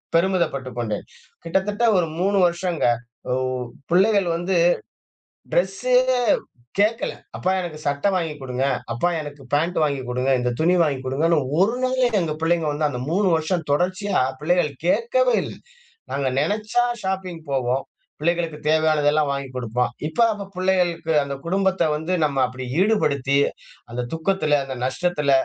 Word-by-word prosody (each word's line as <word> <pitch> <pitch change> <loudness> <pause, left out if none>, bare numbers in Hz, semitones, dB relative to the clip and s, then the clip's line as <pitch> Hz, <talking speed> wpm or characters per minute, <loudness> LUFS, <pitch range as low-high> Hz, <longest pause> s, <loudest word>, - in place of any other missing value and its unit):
பெருமிதப்பட்டுக் 165 - 0
கொண்டேன். 110 -3 -3 0.4
கிட்டத்தட்ட 200 +6 0 0.2
ஒரு 165 - 0
3 200 +2 +2
வருஷங்க 170 -1 -1 0.5
உ - - +2 0.6
பிள்ளைகள் 195 +1 +4
வந்து 175 +2 0 0.9
ட்ரெஸ்சே 195 +8 +2 0.8
கேட்கல. 215 +3 +2 0.2
அப்பா 185 - 0
எனக்கு 160 -3 -6
சட்ட 140 +3 -1
வாங்கி் 165 -4 -1
குடுங்க, 130 0 -2 0.3
அப்பா 120 +10 +1
எனக்கு 145 -2 -9
பேண்ட் 165 +5 +1
வாங்கி் 140 -3 0
குடுங்க. 125 +2 0
இந்த 125 0 0
துணி 170 +3 +3
வாங்கி 140 -4 0
குடுங்கன்னு 155 +5 +2 0.2
ஒரு 200 +5 +4
நாள் 255 0 -1 0.2
எங்க 160 -3 -1
பிள்ளைங்க 165 -1 +1
வந்து 150 0 +1
அந்த 125 -3 -4
3 195 +3 +2
வருஷம் 165 +1 -1
தொடர்ச்சியா 185 +6 +1 0.2
பிள்ளைகள் 175 0 +2 0.2
கேட்கவே - - +2
இல்ல - - -7 0.6
நாங்க 140 -1 -1
நெனச்சா 215 - +1 0.2
ஷாப்பிங் 190 -3 -3
போவோம் 130 0 0 0.4
பிள்ளைகளுக்கு 165 0 0
தேவையானதெல்லாம் 155 -1 +3
வாங்கி் 140 -1 -3
குடுப்போம். 125 0 -1 0.2
இப்ப 160 +9 -1
அப்ப 200 -1 -7
பிள்ளைகளுக்கு 180 -3 +1
அந்த 140 0 -4
குடும்பத்த 190 +1 +1
வந்து 160 +4 -2
நம்ம 140 -2 -2
அப்படி 130 +1 -7
ஈடுபடுத்தி, 140 -10 +2 0.5
அந்த 125 +1 -3
துக்கத்துல, 160 -3 +1
அந்த 135 -1 -5
நஷ்டத்தில, 150 0 0
165 Hz, 135 wpm, -23 LUFS, 140-190 Hz, 0.9 s, பிள்ளைகள்